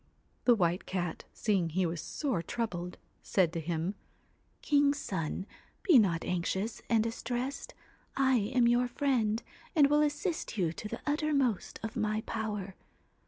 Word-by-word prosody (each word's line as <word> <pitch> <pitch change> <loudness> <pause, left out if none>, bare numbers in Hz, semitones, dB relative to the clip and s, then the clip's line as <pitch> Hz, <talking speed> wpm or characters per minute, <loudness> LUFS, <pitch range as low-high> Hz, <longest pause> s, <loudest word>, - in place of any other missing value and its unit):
' - - -39
The 245 - +7
White 175 -3 0
Cat, 175 -3 -3
seeing 195 -6 +1
he 185 +3 +1
was 165 -1 -2
sore 265 - -2
troubled, 180 -2 -3 0.2
said 175 -4 +2
to 165 - -2
him 165 +3 -2 0.3
' - - -40
King's 285 -1 +3
son, 185 - -3 0.4
be 320 -9 +7
not 170 -6 +2
anxious 190 +5 -1
and 225 -2 +4
distressed. 245 +4 -3 0.4
I 265 -1 +4
am 235 +3 +2
your 240 +1 +3
friend, 240 -4 +1 0.3
and 285 -3 +6
will 295 0 +5
assist 295 - -1
you 170 -4 +1
to 210 - -6
the - - -6
uttermost 290 - 0
of 225 - -4
my 215 -2 0
power. 210 -4 -4
220 Hz, 155 wpm, -31 LUFS, 180-260 Hz, 0.4 s, The